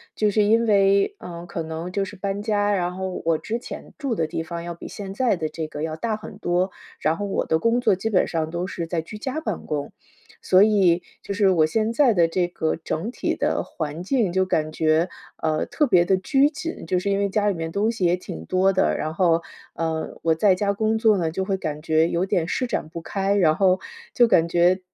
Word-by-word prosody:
就 210 -1 +2
是 210 +1 +3
因 225 +3 +3
为， 200 - +3
呃， 170 -1 -8
可 170 -1 -5
能 160 +2 -5
就 195 +1 -1
是 200 - -9
搬 200 +1 -3
家， 205 -1 +1
然 180 -2 -1
后 190 -1 -4
我 165 -1 +3
之 225 +8 -4
前 - - -9
住 275 -6 -2
的 165 - 0
地 160 - -3
方， 170 +1 -6
要 170 0 -5
比 170 - -10
现 195 -2 -7
在 240 +1 +2
的 160 -3 -3
这 160 0 -5
个 150 0 -6
要 160 0 -3
大 220 +5 -1
很 215 - -10
多。 180 +2 0 0.3
然 155 +2 +1
后 205 - -3
我 200 - -1
的 160 - +1
工 230 +6 +2
作 225 -4 +4
基 220 +4 -2
本 195 -4 +3
上 160 -2 -2
都 175 +2 -3
是 175 -3 -5
在 165 0 -1
居 190 +7 -9
家 265 +8 -4
办 - - -4
公， 145 -2 -3 0.5
所 185 +2 +5
以， 190 -5 +3 0.2
就 200 - -5
是 200 -1 +3
我 165 -4 +4
现 215 +8 0
在 245 0 +4
的 170 -4 +3
这 175 +1 +1
个 160 -2 -2
整 165 +6 -4
体 - - -2
的 - - 0
环 155 +1 -5
境， 220 -2 +1
就 190 +1 +2
感 155 -4 0
觉， 160 +2 +2 0.3
呃， 155 -1 +1
特 300 - +1
别 180 -9 +4
地 190 - +3
拘 270 +10 +3
谨， 320 - -6
就 180 +3 0
是 185 +3 -1
因 195 - +1
为 200 - +2
家 205 +1 +1
里 - - +1
面 165 -2 -4
东 210 +3 +1
西 220 -6 -1
也 175 +1 +4
挺 80 - -8
多 185 - +2
的。 190 - +2
然 155 - -3
后， 170 -1 +2 0.3
呃， 160 -1 -3
我 165 - +3
在 185 +4 +3
家 200 +2 0
工 220 +2 0
作 220 -2 +4
呢， 165 -3 0
就 180 +4 -2
会 190 0 -1
感 150 -4 -4
觉 160 +1 +2
有 170 +2 0
点 185 -5 0
施 255 +8 -1
展 195 - -2
不 165 +1 -7
开， 195 +3 -1
然 170 -6 +4
后 190 -1 +3 0.3
就 240 -1 +4
感 165 -6 +4
觉， 175 +2 +3
185 Hz, 260 characters per minute, -23 LUFS, 165-205 Hz, 0.5 s, 所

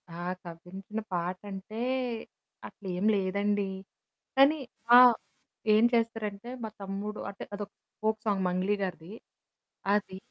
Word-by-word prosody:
ఆ! 170 +1 -7 0.2
కవ్వించిన 180 +5 -7
పాటంటే 190 +5 -4 0.9
అట్లేం 185 -1 -4
లేదండి. 200 +1 +1 0.7
కానీ, 280 +3 +7 0.4
ఆహ్, 250 -2 +9 0.6
ఏం 215 +1 +6
చేస్తారంటే 225 -2 0
మా 220 - -2
తమ్ముడు 200 +2 -4
అంటే, 200 - -8
అదొక 205 0 -5 0.3
ఫోక్ 220 0 +2
సాంగ్ 200 -3 +1
'మంగ్లీ' 185 +3 +1
గారిది. 180 0 -5 0.8
అది. 205 -2 0
200 Hz, 105 wpm, -30 LUFS, 185-215 Hz, 0.9 s, ఆహ్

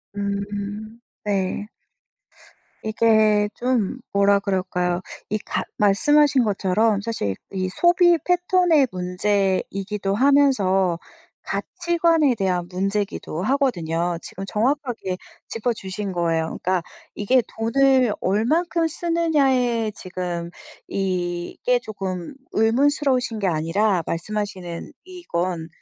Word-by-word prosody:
음. 205 +2 -4 0.2
네. 200 0 -1 1.2
이게 215 -1 +3
좀 250 -1 0
뭐라 200 0 +4
그럴까요? 180 -2 -1 0.3
이 215 - 0
가 - - -3
말씀하신 270 +7 +4
것처럼 205 +1 +1
사실 205 - -2 0.2
이 185 -1 -2
소비 345 - +4
패턴의 355 -5 +3
문제이기도 195 +2 -1
하면서 210 -9 +3 0.5
가치관에 335 -6 +1
대한 180 -4 -1
문제기도 195 -3 -2
하거든요. 175 - 0
지금 195 - -7
정확하게 240 - -1 0.3
짚어주신 210 -4 -3
거예요. 165 -2 -1
그러니까 185 -1 +1 0.3
이게 250 +5 +3 0.2
돈을 255 +1 +3
얼마큼 320 - +1
쓰느냐에 275 -9 +1
지금 175 -2 -4 0.4
이게 180 +5 -1
쪼끔 195 -2 -5 0.2
의문스러우신 250 +1 +2
게 200 - 0
아니라 175 +3 +1
말씀하시는 185 -1 -4
이건, 180 - -3
210 Hz, 235 characters per minute, -23 LUFS, 185-260 Hz, 1.2 s, 뭐라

